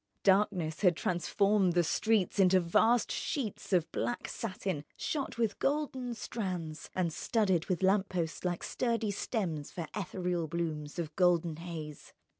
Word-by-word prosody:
Darkness 190 -5 +2
had 180 -4 +5
transformed 190 +2 +2
the 175 0 +4
streets 210 +3 +1
into 185 -1 +6
vast 220 +7 +3
sheets 235 -9 -3
of 175 -4 +2
black 240 - -2
satin 190 -7 -3
shot 280 -6 -3
with 225 -3 0
golden 270 -4 -1
strands 180 -9 -4
and 175 -3 0
studded 190 -6 +1
with 185 0 -1
lamp 195 +1 +3
posts 170 -3 -2
like 175 -2 -1
sturdy 230 -4 0
stems 180 - -2
for 170 - -4
ethereal 180 -4 -2
blooms 155 -2 -3
of 155 -3 -4
golden 175 -3 +3
haze. 160 -3 -7
185 Hz, 140 wpm, -32 LUFS, 170-210 Hz, -, into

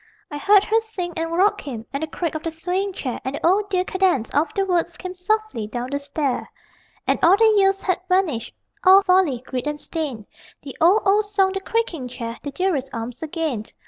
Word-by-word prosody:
_) - - -31 0.3
I 290 - -5
heard 400 +5 +5
her 445 +2 +2
sing, 390 -6 -5
and 330 0 -2
rock 395 +4 +2
him, 235 -6 -7
And 275 - -2
the 315 - -2
creak 330 +1 -3
of 315 - -4
the 330 - -3
swaying 360 +5 -2
chair, 255 -8 -4
And 265 +2 -3
the - - -4
old 400 +4 +3
dear 365 -2 +1
cadence 370 -12 +1
of 300 +3 +2
the 395 -1 +1
words 345 -2 0
Came 365 -1 -6
softly 400 - -1
down 245 +3 -5
the 285 - -1
stair. 285 -2 -2 0.6
And - - +1
all 365 +4 +6
the 440 0 +5
years 390 -1 +3
had 370 -1 0
vanished, 350 - +1 0.3
All 380 +1 +7
folly, 365 - +2
greed, 255 +1 -4
and 295 0 -3
stain 285 -12 -4 0.4
The 275 -2 -8
old, 370 +7 +5
old 410 +2 +3
song, 400 -2 +2
the 390 - -2
creaking 385 - -2
chair, 235 -1 -6
The 285 - -5
dearest 285 -3 -1
arms 235 +1 -6
again! 310 -8 -3
340 Hz, 215 wpm, -22 LUFS, 280-390 Hz, 0.6 s, All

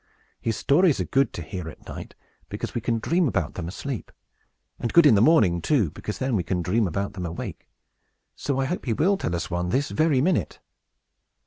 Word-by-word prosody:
His 115 -2 -1
stories 160 +1 +3
are - - +1
good 135 +1 +2
to 85 - -5
hear 80 +1 -6
at - - -14
night, - - -8 0.3
because - - -5
we 120 - -2
can 115 +1 0
dream 170 +9 +1
about 85 - -1
them 85 -2 -5
asleep; 120 +6 -5 0.7
and 120 - -2
good 170 -2 +6
in 145 - +7
the 100 - +4
morning, 105 - +4
too, 110 - +2
because 105 +5 -6
then 130 -2 -1
we 95 - +2
can 90 0 -2
dream 105 +5 +1
about 100 +4 -3
them 90 - -5
awake. 85 0 -7 0.7
So 135 0 -2
I 135 - +1
hope 175 +7 -3
he 120 - +1
will 180 - +3
tell 90 - -2
us 85 +1 -4
one 90 +1 -1
this 140 +9 0
very 155 -4 +2
minute." 170 +5 0
115 Hz, 210 wpm, -25 LUFS, 90-145 Hz, 0.7 s, in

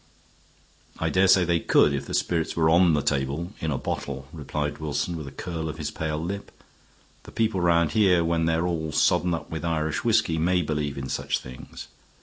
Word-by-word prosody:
"I - - -1
dare 95 +1 +4
say 90 -1 +5
they 85 0 +2
could 75 - +4
if 70 - -3
the - - -3
spirits 80 -2 0
were 80 -1 +3
on 85 -1 +5
the 75 - 0
table 70 +6 -1
in 80 - -2
a 70 - -1
bottle," 70 0 -4
replied 75 -1 -4
Wilson, 75 +3 -2
with 75 -4 -6
a - - -8
curl 80 -1 -5
of 75 - -6
his 75 -2 -4
pale 80 -2 -3
lip. 95 +6 -5 0.7
"The - - -13
people 110 -4 0
round 85 -2 +3
here, 95 -6 +4
when 85 0 +1
they're 80 +1 +1
all 80 -3 -2
sodden 85 +3 +2
up 75 -3 -8
with 80 0 -4
Irish 80 +2 -1
whisky, 110 -9 +2
may 90 +2 +2
believe 75 -2 -2
in 65 -1 -4
such - - -1
things. 65 0 -10
80 Hz, 200 wpm, -25 LUFS, 75-85 Hz, 0.7 s, say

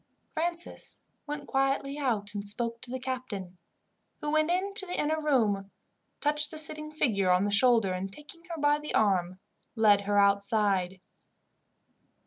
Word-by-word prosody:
Francis 340 +1 -3 0.2
went 290 -1 -6
quietly 275 +1 0
out 215 -7 -1
and 205 -1 -4
spoke 230 +3 0
to - - -7
the 260 +1 -4
captain, 235 -9 -6 0.6
who 295 - -3
went 310 +1 +2
in 375 +3 0
to 395 -2 +1
the 355 - -3
inner 310 +1 0
room, 215 -10 +1 0.5
touched 295 0 +2
the 315 - -7
sitting 305 0 +4
figure 215 -11 0
on 180 +1 +3
the 205 - -1
shoulder, 225 -3 +4
and, 190 +1 -4
taking 300 +7 -13
her 335 -2 -7
by 290 0 +2
the 300 - -5
arm, 185 -3 +1 0.4
led 210 -3 +4
her 205 0 -1
outside. 200 -2 +1
250 Hz, 155 wpm, -28 LUFS, 200-300 Hz, 0.6 s, sitting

